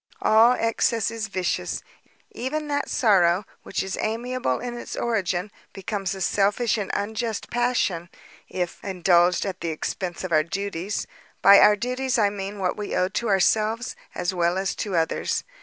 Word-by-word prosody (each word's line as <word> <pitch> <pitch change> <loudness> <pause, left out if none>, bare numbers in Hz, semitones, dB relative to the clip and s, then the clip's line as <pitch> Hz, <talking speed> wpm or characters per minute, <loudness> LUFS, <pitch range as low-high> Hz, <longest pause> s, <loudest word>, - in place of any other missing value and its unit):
All 225 - +6
excess 230 -2 +1
is 225 -2 -4
vicious; 185 -3 -2 0.5
even 300 +5 -3
that 285 0 -1
sorrow, 190 -4 +3 0.2
which - - -3
is 190 0 -4
amiable 230 - -1
in 245 -1 -5
its 240 - -6
origin, 200 -4 -1 0.2
becomes 195 -1 -3
a 190 - -8
selfish 205 +6 +2
and 200 - -3
unjust 220 +2 -3
passion, 240 -8 0 0.4
if 180 -2 -4
indulged 180 -2 +3
at 190 -2 -5
the 170 - -2
expence 175 +3 -4
of 185 - -4
our 155 -1 +5
duties—by 195 +2 +1
our 210 - +7
duties 250 +3 -1
I 205 -3 +3
mean 200 0 -5
what 185 -2 -1
we 210 -1 -4
owe 185 0 +2
to 230 +4 -2
ourselves, 215 +5 +1 0.2
as 175 - -1
well 175 0 +1
as 195 0 -1
to 200 -4 -3
others. 165 -1 0
200 Hz, 155 wpm, -24 LUFS, 180-230 Hz, 0.5 s, our